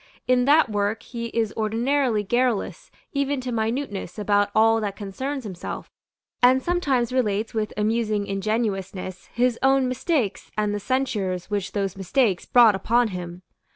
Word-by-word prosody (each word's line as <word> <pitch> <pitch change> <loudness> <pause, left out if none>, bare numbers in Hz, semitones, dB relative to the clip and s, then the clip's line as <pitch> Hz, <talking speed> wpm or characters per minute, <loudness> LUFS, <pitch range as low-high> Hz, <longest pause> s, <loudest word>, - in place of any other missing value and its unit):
In 250 -1 +3
that 300 +2 +5
work 205 +1 -1
he 235 -2 -5
is 225 -2 -1
ordinarily 230 +1 +1
garrulous 240 +1 -1 0.2
even 280 -1 0
to 250 0 -4
minuteness 225 -4 -3
about 205 -1 +2
all 225 +1 +4
that 200 -2 -3
concerns 260 +8 -4
himself, 190 -5 -7 0.5
and 255 +1 +6
sometimes 275 -9 0
relates 220 -4 0
with 215 -2 -1
amusing 215 -1 0
ingenuousness 195 -2 -3
his 245 0 0
own 270 -1 +3
mistakes 255 - -1
and 210 -1 0
the 205 - -2
censures 210 -7 -2
which 200 -2 -2
those 195 -2 -1
mistakes 195 0 0
brought 235 -4 +6
upon 230 +4 +2
him. 180 -1 -7
220 Hz, 145 wpm, -24 LUFS, 205-255 Hz, 0.5 s, and